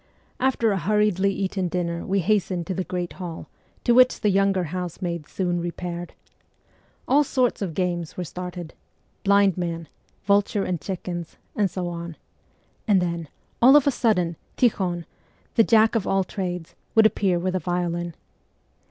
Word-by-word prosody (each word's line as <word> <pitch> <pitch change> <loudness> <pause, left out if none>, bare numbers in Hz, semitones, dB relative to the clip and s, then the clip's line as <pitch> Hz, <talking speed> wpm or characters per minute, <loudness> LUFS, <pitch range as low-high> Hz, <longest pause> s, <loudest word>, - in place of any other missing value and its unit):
After 250 -4 +2
a 195 - 0
hurriedly 200 +1 +2
eaten 190 -1 -2
dinner 170 -1 -2
we 195 0 0
hastened 185 -2 0
to 185 - -3
the 185 - -2
great 180 -1 -4
hall, 175 -3 -7 0.4
to - - +3
which 255 +1 +5
the 210 - +3
younger 195 -1 +2
housemaids 175 -1 -4
soon 175 -2 -1
repaired. 175 0 -5 0.9
All 285 +3 +5
sorts 255 -5 0
of 175 -6 -3
games 175 -3 -2
were 180 - -2
started 175 +1 -7 0.5
blind 200 -2 +4
man, 170 -2 -3 0.4
vulture 200 0 +2
and 175 -4 -2
chickens, 175 -3 -5 0.2
and 205 -2 +2
so 180 0 -3
on; 170 -1 -6 0.7
and 200 -3 +5
then, 170 -2 -2 0.3
all 260 +4 +8
of 295 - +6
a 285 - +4
sudden, 180 - +1 0.2
Tikhon, 185 -8 +1 0.5
the 225 - +5
Jack 220 -1 +4
of 225 -5 0
all 195 0 +2
trades, 180 -3 -5 0.2
would 220 -1 +7
appear 195 -4 +2
with 185 +2 -1
a 185 - +1
violin. 175 -1 -2
185 Hz, 155 wpm, -24 LUFS, 175-200 Hz, 0.9 s, all